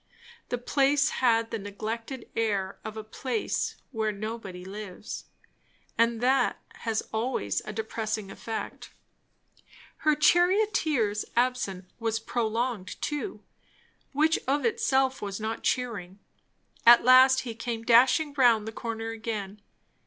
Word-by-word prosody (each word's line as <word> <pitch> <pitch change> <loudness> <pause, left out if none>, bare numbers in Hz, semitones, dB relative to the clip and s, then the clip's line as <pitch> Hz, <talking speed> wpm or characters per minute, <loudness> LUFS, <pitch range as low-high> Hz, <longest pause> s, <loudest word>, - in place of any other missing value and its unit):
The 245 - -1
place 275 +3 +2
had 230 -3 +2
the 225 - -2
neglected 225 +5 -5
air 200 -4 -1
of 220 0 -7
a 220 - -5
place 225 +2 -2 0.2
where 220 -3 0
nobody 200 -3 -6
lives, 200 0 -7 0.7
and 230 0 +2
that 260 +2 +2 0.2
has 225 -2 -2
always 220 - -1
a 215 - -5
depressing 215 -1 -3
effect. 225 +2 -6 1.1
Her 305 -1 +2
charioteer's 315 - +3
absence 240 -7 0
was 225 -1 -1
prolonged, 225 -2 -2
too; 295 +6 -4 0.7
which 310 +3 +2
of 280 0 +1
itself 265 +3 +1
was 200 0 -4
not 220 +1 -3
cheering. 205 -8 -2 0.7
At 235 0 +8
last 260 +1 +7
he 240 -3 -5
came 230 0 -4
dashing 260 +6 +5
round 235 -5 +4
the - - -3
corner 225 0 -4
again. 215 -3 -5
230 Hz, 120 wpm, -28 LUFS, 215-260 Hz, 1.1 s, At